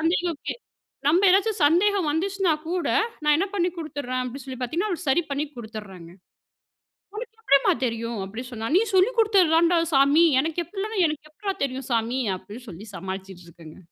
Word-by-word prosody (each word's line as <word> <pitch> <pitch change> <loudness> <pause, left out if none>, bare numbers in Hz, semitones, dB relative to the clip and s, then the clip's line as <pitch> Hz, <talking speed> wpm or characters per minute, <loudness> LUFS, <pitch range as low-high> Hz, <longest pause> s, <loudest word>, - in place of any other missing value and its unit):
சந்தேகம் 335 0 0 0.7
நம்ம 365 +6 +4
ஏதாச்சும் 400 +1 +2
சந்தேகம் 365 +1 +3
வந்துச்சுனா 375 +2 +1 0.2
கூட, 355 0 -1 0.3
நான் 300 0 +4
என்ன 390 - +1
பண்ணி 355 -2 +1
கொடுத்துறேன் 285 -5 -4
அப்டினு 255 +1 -6
சொல்லி 260 -1 -7
பார்த்தீங்கன்னா, 330 - -1
அவளுக்கு 340 -4 -4
சரி 345 +6 +3
பண்ணி 280 +2 -1
கொடுத்துறேங்க. 205 -7 -9 1.0
உனக்கு 450 0 -7
எப்டிம்மா 275 -10 +4
தெரியும்? 230 -1 -3
அப்டி 220 +6 -7
சொன்னாள். 225 +5 -4
நீ - - +4
சொல்லி 380 +7 +5
கொடுத்ததுதாண்டா 350 -5 +4
சாமி, 280 +5 +5 0.2
எனக்கு 325 +3 -2
எப்டி? 400 +2 -3
எனக்கு 305 0 -5
எப்பட்றா 390 +5 -4
தெரியும்? 265 0 -3
சாமி 235 +3 0 0.2
அப்படினுசொல்லி 210 -1 -11
சமாளிச்சுட்டுருக்கேங்க. 180 -4 -9
300 Hz, 145 wpm, -24 LUFS, 235-360 Hz, 1.0 s, சொல்லி